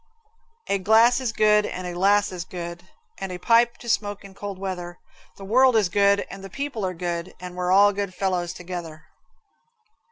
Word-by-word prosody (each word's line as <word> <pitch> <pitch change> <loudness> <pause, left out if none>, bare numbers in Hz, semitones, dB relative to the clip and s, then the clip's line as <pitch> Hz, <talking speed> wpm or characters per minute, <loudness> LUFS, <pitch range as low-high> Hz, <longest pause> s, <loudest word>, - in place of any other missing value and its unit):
A 200 - 0
glass 225 +5 +5
is 250 -3 -1
good 210 -1 +4
and 185 -2 -5
a 175 - -4
lass 200 +3 +2
is 180 -2 -5
good, 175 0 -8 0.3
And 195 -1 -5
a 180 - -5
pipe 235 +5 +3
to 240 - -12
smoke 205 -3 -1
in 195 - -12
cold 200 0 -7
weather. 180 -2 -5 0.4
The 195 - -9
world 255 +4 +4
is 210 -5 +3
good 200 +2 +3
and 195 0 -10
the 195 - -8
people 275 -1 -4
are 185 -1 -2
good, 170 0 -4
And 180 0 -8
we're 180 0 -1
all 205 +2 +6
good 200 -1 -3
fellows 180 -3 -1
together. 175 -4 -8
195 Hz, 190 wpm, -24 LUFS, 180-210 Hz, 0.4 s, all